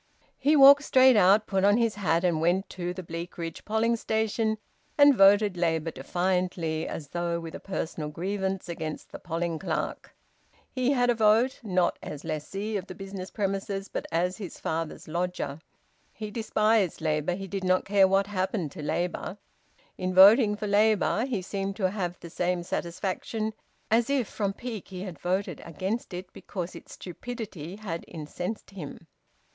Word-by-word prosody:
He 290 +4 +4
walked 280 0 +9
straight 260 -3 +6
out, 205 +2 +5
put 195 -1 0
on 205 +2 +5
his 230 -2 +2
hat, 170 -4 +1
and 170 -3 +1
went 180 +4 +2
to 175 -1 -3
the 185 +1 -6
Bleakridge 165 0 -6
polling 220 +2 +2
station 220 0 0 0.4
and 285 -1 +8
voted 200 -2 +5
Labour 165 -2 0
defiantly, 175 +1 -1
as 145 -3 -6
though 170 0 -1
with 165 -1 -8
a - - -6
personal 160 -5 -4
grievance 190 +3 -3
against 160 -2 -5
the - - -8
polling 165 -1 -3
clerk. 170 -3 -3 0.6
He 255 +1 +1
had 245 -2 +3
a - - +3
vote, 225 +3 +3
not 185 -6 +1
as 150 -1 -7
lessee 195 +8 -3
of 190 0 -6
the 185 - -8
business 195 -1 -7
premises, 195 -1 -2
but - - -4
as 180 +3 0
his 195 -6 -8
father's 160 0 -3
lodger. 170 -3 -3 0.5
He 215 -1 -7
despised 215 -3 +1
Labour; 155 +2 0
he 195 +1 -6
did 190 +1 -4
not 185 0 +2
care 195 -1 +5
what 195 +1 +3
happened 190 -5 -2
to 160 - -8
Labour. 175 +5 -2 0.6
In 185 0 -2
voting 210 +3 +8
for 210 - -5
Labour, 210 +2 +3
he 220 -8 -2
seemed 195 +1 -3
to 190 -3 0
have 180 -4 -3
the 170 - -9
same 180 0 -1
satisfaction 190 +6 -3 0.4
as 230 +2 +3
if 270 -6 +1
from 200 -2 -2
pique 225 -2 -6
he 185 -1 -7
had 180 -6 -7
voted 185 +3 -2
against 190 +9 -3
it 180 +1 -7
because 180 -2 -6
its - - -11
stupidity 195 -3 -7
had 190 -6 -5
incensed 180 +7 -6
him. 165 -4 -8
190 Hz, 165 wpm, -27 LUFS, 175-215 Hz, 0.6 s, walked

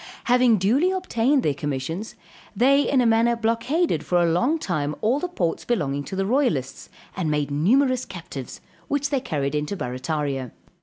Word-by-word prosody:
Having 245 -2 +4
duly 245 - +2
obtained 290 -8 +1
their 150 - +1
commissions, 145 - -4 0.4
they 270 +6 +4
in 270 -2 +3
a - - +2
manner 230 +1 +3
blockaded 230 +9 0
for 180 - +1
a 175 - +3
long 250 - +2
time 155 - -2
all 235 +6 +1
the 360 - -2
ports 175 - -2
belonging 145 - -1
to - - -6
the 195 0 0
royalists, 195 - -1 0.3
and 180 -4 -1
made 150 -1 -1
numerous 255 - +2
captives, 165 -9 -8 0.3
which 285 0 -1
they 275 - +2
carried 145 - -2
into 150 +6 -2
Barrataria. 135 - -3
205 Hz, 165 wpm, -23 LUFS, -, 0.4 s, Having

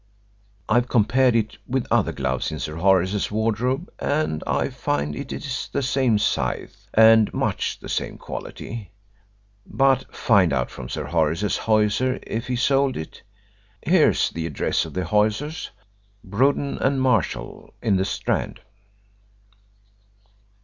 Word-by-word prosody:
I've 120 +4 +2
compared 125 +2 +3
it 110 -2 -1
with 130 0 -1
other - - +3
gloves 65 0 -2
in 80 - -4
Sir 75 +1 -5
Horace's 95 +2 +2
wardrobe, 115 - -1
and 145 - -1
I - - 0
find 75 +1 -2
it - - -6
is - - -4
the - - -1
same 130 -3 +2
size 105 - -2
and 110 -1 +6
much - - -1
the - - -10
same - - -3
quality. 110 -4 -7 0.7
But 135 +2 +1
find 100 -9 +3
out 65 -2 -1
from - - -8
Sir - - -4
Horace's 85 +4 0
hosier 110 +4 +1
if 115 +3 -4
he 125 - -1
sold 135 +1 +2
it. 80 - -8 0.6
Here's 170 -1 +3
the 85 0 -4
address 75 - -1
of - - -10
the 90 -1 -1
hosiers, 110 - 0 0.5
Bruden 135 +8 0
and 135 0 +1
Marshall, 110 - -1
in 105 -5 +1
the 95 - 0
Strand." 95 - -2
110 Hz, 135 wpm, -23 LUFS, 95-130 Hz, 0.7 s, and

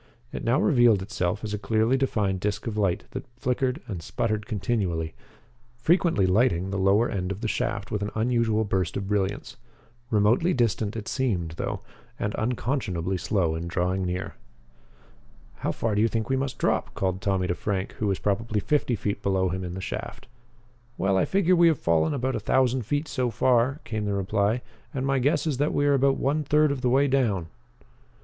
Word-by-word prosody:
It - - -5
now 120 +5 +2
revealed 120 -8 +4
itself 100 -1 -2
as 105 -1 -3
a 105 - -2
clearly 110 +4 +2
defined 105 -8 0
disc 100 +1 -2
of 115 -3 -3
light 95 -4 0
that 130 - -5
flickered 130 +2 -1
and 95 -6 -5
sputtered 110 +5 -2
continually, 95 -8 -1 0.6
frequently 165 - +3
lighting 95 -2 +2
the 100 - -1
lower 100 +5 +4
end 90 -1 -3
of 100 +2 -5
the 115 - -1
shaft 100 -2 -2
with 105 - -1
an 105 - -1
unusual 110 -1 +1
burst 95 -3 -1
of 100 - -4
brilliance. 100 -1 -2 0.5
Remotely 115 - +3
distant 115 -3 0
it 110 -2 -5
seemed 100 -11 -1
though, 80 - -4 0.4
and 105 0 -2
unconscionably 110 - -1
slow 90 -2 0
in 80 +1 -4
drawing 90 +2 0
nearer. 90 +1 -3 1.2
"How - - -1
far 115 -2 -1
do 105 - +2
you 115 - +4
think 115 0 -2
we 135 - +2
must 135 0 -2
drop?" - - 0
called 95 0 -1
Tommy 95 -2 0
to 90 - 0
Frank, 95 +2 -2
who 105 - 0
was 95 -2 +1
probably 105 +2 -1
fifty 135 +1 +1
feet 100 -1 -3
below 95 -2 +1
him 95 +1 -3
in 90 0 -5
the 95 - -5
shaft. - - -6 0.7
"Well, 95 +1 +1
I 95 - +3
figure 185 -2 +3
we 170 -1 +6
have 160 -3 +3
fallen 80 - +1
about 130 0 -1
a - - -1
thousand 130 -3 +1
feet 145 +2 -1
so 125 -3 -1
far," 125 +4 +2
came 110 -1 -3
the 100 -1 -1
reply, 100 +4 0 0.3
"and 135 0 -1
my 135 -1 +2
guess 140 +6 +1
is 150 -5 0
that 145 +3 0
we 145 - +2
are 145 - +4
about 135 0 +3
one 150 +3 0
third 150 +1 +3
of 140 -2 -3
the 125 - +2
way 135 +3 +4
down." 110 -11 +1
110 Hz, 195 wpm, -26 LUFS, 95-130 Hz, 1.2 s, we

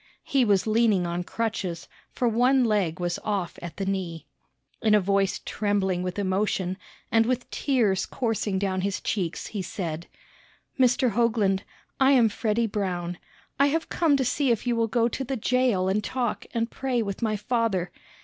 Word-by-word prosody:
He 270 -2 +2
was 200 -4 +3
leaning 215 -4 +3
on 175 +1 -2
crutches; 190 -5 -3 0.2
for 245 - 0
one 250 +3 +4
leg 195 -6 +1
was 175 0 -1
off 195 -5 -2
at 170 -2 -8
the 195 - -2
knee. 185 -4 -3 0.6
In 215 -1 +4
a - - +6
voice 195 0 +1
trembling 200 -4 0
with 180 +1 -4
emotion, 190 -1 0 0.3
and 225 0 +4
with 255 0 -1
tears 220 -9 +1
coursing 220 -5 -1
down 190 -1 -1
his 195 0 -1
cheeks, 180 -5 -2
he 205 - -2
said: 170 -3 -5 0.7
"Mr. 250 -1 +4
Hoagland, 210 -4 +2 0.4
I 270 +1 +5
am 240 -4 +5
Freddy 220 +2 0
Brown. 180 -5 -3 0.4
I 280 - +6
have 320 +3 -1
come 315 -5 +3
to 265 - 0
see 265 +3 +1
if 235 -1 +1
you 240 -1 +1
will 230 0 +1
go 230 +1 +2
to 255 +3 -3
the 265 +1 -3
jail 240 -5 +2
and 200 +2 +1
talk 245 0 -2
and 230 0 -1
pray 255 -3 -1
with 200 0 -5
my 220 -2 +1
father. 210 -4 0
210 Hz, 175 wpm, -26 LUFS, 190-240 Hz, 0.7 s, a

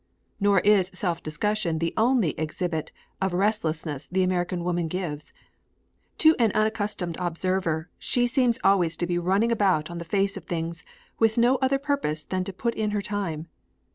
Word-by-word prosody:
Nor 200 -2 +4
is 200 -3 +4
self 175 -3 -2
discussion 170 +2 -1
the 165 +1 -1
only 225 - +3
exhibit 160 +1 -2 0.3
of 190 -2 0
restlessness 165 -7 -1
the 185 +1 +1
American 180 -1 -1
woman 175 -1 0
gives. 160 -4 -4 0.9
To 315 0 +6
an 225 -3 +4
unaccustomed 205 -5 -1
observer 175 -2 -1
she 245 -1 +1
seems 245 -1 +2
always 185 -4 +3
to 175 - -1
be 175 0 0
running 195 +6 +2
about 185 -8 +2
on 170 - -5
the - - -5
face 195 +3 0
of 180 - -9
things 165 -1 -4 0.4
with 225 0 +3
no 245 +3 +4
other 265 +1 +2
purpose 270 - -1
than 185 +4 -2
to 195 - -4
put 235 +5 -2
in 215 -2 -1
her - - 0
time. 190 -7 -3
185 Hz, 170 wpm, -26 LUFS, 170-215 Hz, 0.9 s, To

